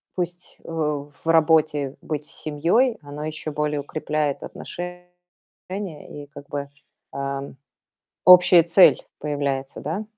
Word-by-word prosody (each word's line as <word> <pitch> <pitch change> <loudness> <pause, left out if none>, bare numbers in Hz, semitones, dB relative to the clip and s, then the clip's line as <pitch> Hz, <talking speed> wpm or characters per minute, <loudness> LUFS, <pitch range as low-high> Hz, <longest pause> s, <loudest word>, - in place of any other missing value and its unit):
пусть, 175 0 -5
э, - - -11
в 150 -3 -3
работе, 155 -4 +3
быть 150 -1 -4
с - - -13
семьей, 175 - +1
оно 145 +1 -7
ещё 155 0 -5
более 150 0 -1
укрепляет 150 0 -2
отношения, 180 0 -7 1.2
и - - -14
как 140 0 -12
бы, 140 -1 -4 0.4
а, 140 0 -3 0.8
общая 180 -1 +8
цель 175 +3 +6 0.2
появляется, 140 -2 -3
да. 165 +9 -3
150 Hz, 120 wpm, -23 LUFS, 145-170 Hz, 1.2 s, общая